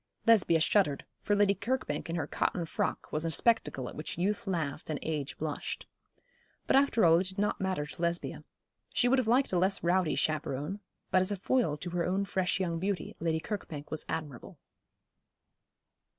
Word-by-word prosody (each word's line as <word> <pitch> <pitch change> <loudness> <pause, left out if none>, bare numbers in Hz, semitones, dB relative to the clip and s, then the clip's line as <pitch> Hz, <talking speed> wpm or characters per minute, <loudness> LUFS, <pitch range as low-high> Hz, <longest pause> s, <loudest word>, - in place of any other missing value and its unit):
Lesbia 205 -7 +5
shuddered, 150 -2 +2 0.2
for 205 - +1
Lady 205 -1 +4
Kirkbank 205 - -2
in 165 - -2
her 165 - -1
cotton 175 - -1
frock - - -2
was 155 - 0
a 165 - 0
spectacle 160 - +1
at - - -7
which 155 - -5
youth 200 +4 -1
laughed 160 -6 -2
and 155 - -1
age 150 -3 -3
blushed. - - -4 0.8
But - - +3
after 270 -7 +4
all 165 0 +6
it 185 - -1
did 190 +1 -7
not 205 0 0
matter 185 -6 -1
to 150 +3 -10
Lesbia. 170 0 -1 0.5
She 245 - +2
would 265 +2 +4
have 250 - -1
liked 250 -1 +3
a 180 - +3
less 190 +2 +1
rowdy 175 -1 +2
chaperon; 155 +4 -1 0.3
but 185 - +5
as 185 - +1
a - - +1
foil 195 - +1
to 175 +4 -6
her 175 -1 0
own 190 +3 0
fresh 190 -1 0
young 170 -3 -1
beauty 200 +3 -2
Lady 165 -1 0
Kirkbank 160 -6 -6
was 155 - 0
admirable. 145 -7 -5
180 Hz, 185 wpm, -31 LUFS, 155-205 Hz, 0.8 s, all